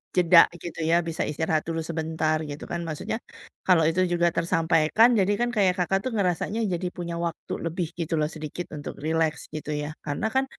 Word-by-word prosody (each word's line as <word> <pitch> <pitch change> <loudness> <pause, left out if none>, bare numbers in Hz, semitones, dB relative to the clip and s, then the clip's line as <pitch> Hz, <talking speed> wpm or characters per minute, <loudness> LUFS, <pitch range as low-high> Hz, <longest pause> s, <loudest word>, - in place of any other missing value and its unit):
jeda 180 -1 +7 0.2
gitu 170 -1 -6
ya, 170 - +5
bisa 165 - -1
istirahat 155 +1 0
dulu 165 0 -1
sebentar 160 -1 0
gitu 145 - -7
kan. 170 0 -2
Maksudnya, 190 +8 -3 0.5
kalau 175 -4 +5
itu 170 +3 +1
juga 175 0 +3
tersampaikan, 165 +5 +3
jadi 195 +2 +3
kan 240 - +2
kayak 190 -3 +4
Kakak 195 +2 +2
tuh 255 - -1
ngerasanya 200 +2 0
jadi 180 +1 -2
punya 170 -1 -4
waktu 170 - -5
lebih 165 0 -2
gitu 165 -1 -2
loh 150 - +2
sedikit 155 +3 -5
untuk 145 - -6
rileks 160 -1 +1
gitu 150 0 -5
ya. 150 - -4 0.2
Karena 145 +7 -2
kan, 265 0 +3
165 Hz, 185 wpm, -26 LUFS, 160-180 Hz, 0.5 s, jeda